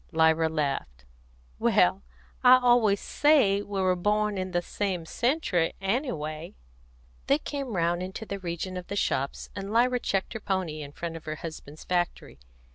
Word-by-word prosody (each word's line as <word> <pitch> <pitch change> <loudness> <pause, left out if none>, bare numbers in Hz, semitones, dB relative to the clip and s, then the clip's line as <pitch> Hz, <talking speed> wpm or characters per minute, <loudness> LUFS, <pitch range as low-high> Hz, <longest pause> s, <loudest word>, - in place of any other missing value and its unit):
Lyra 160 0 +3
laughed. 140 - -3 0.5
"Well, - - +3 0.4
I 255 0 +9
always 240 -5 +4
say 265 -10 +3
we 205 -1 -4
were 185 -1 +3
born 210 +3 +1
in 185 -1 -3
the 175 -1 -1
same 185 -3 -2
century, 220 - 0
_any_way." 175 - -3 0.7
They 280 - +4
came 280 -6 -5
round 170 0 +1
into 190 +4 -6
the 200 -1 -5
region 180 +1 -4
of 180 - -7
the 200 - -4
shops, 140 -8 -1
and 195 +1 -5
Lyra 245 +2 +3
checked 195 -3 -1
her 220 - -4
pony 185 -7 -2
in 145 -1 -8
front 165 +2 -5
of 160 - -13
her 155 0 -3
husband's 155 -2 -9
factory. 175 - -2
185 Hz, 160 wpm, -27 LUFS, 160-210 Hz, 0.7 s, I